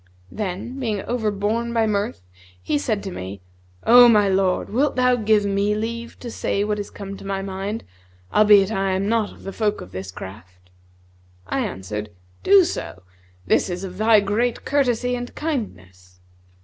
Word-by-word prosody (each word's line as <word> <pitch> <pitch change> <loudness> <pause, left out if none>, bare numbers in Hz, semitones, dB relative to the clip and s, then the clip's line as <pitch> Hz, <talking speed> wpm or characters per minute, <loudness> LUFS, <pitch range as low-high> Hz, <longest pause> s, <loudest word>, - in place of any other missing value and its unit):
Then, 210 +6 -4
being 215 -6 -2
overborne 220 0 -1
by 225 -1 +2
mirth, 200 - -2 0.4
he 120 +11 -1
said 205 +5 -1
to 195 - -5
me, 95 - -7 0.4
'O 245 +1 +8
my 210 -3 +5
lord, 190 -1 +1
wilt 270 +6 +1
thou 250 -1 +3
give 215 -3 +2
me 200 +1 +1
leave 235 +2 -4
to 240 - -6
say 200 -2 -1
what 210 0 -1
is 205 - -5
come 195 -1 -8
to - - -12
my 195 0 -3
mind, 195 +3 -4 0.5
albeit 210 -1 +6
I 195 -2 0
am 190 +1 -1
not 225 -1 +1
of - - -16
the 195 - -6
folk 215 -2 0
of 90 - -10
this 95 0 -6
craft?' 90 -1 -11 0.7
I - - -2
answered, 105 - -4 0.3
'Do 395 -1 +6
so; 215 - -5 0.4
this 95 - +2
is 180 +1 -4
of 185 0 -7
thy 215 -1 +5
great 225 +4 -1
courtesy 250 -3 +1
and 245 0 -6
kindness.' 90 - -5
205 Hz, 170 wpm, -22 LUFS, 185-230 Hz, 0.7 s, O